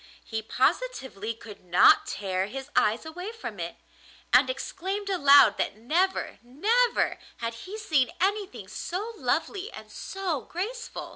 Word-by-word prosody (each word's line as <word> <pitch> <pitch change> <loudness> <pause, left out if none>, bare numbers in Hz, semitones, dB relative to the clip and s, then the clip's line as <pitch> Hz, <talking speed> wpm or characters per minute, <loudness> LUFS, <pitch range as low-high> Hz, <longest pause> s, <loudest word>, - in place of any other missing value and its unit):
He 220 -1 -4
positively 230 - -1
could 215 -3 -12
not 180 +1 +6
tear 190 -1 -2
his 270 +5 -7
eyes 220 +7 +2
away 360 +6 -6
from 460 0 -7
it, - - -4 0.6
and - - +6
exclaimed 400 -4 -3
aloud 280 - +6
that - - 0
never, 340 - 0
never 440 - +1 0.2
had 230 0 -3
he 370 - -8
seen 305 - +2
anything 400 +2 -1
so 415 +6 -4
lovely 420 +1 -1
and - - -11
so 370 -8 -3
graceful. 460 +8 -5
340 Hz, 135 wpm, -27 LUFS, -, 0.6 s, not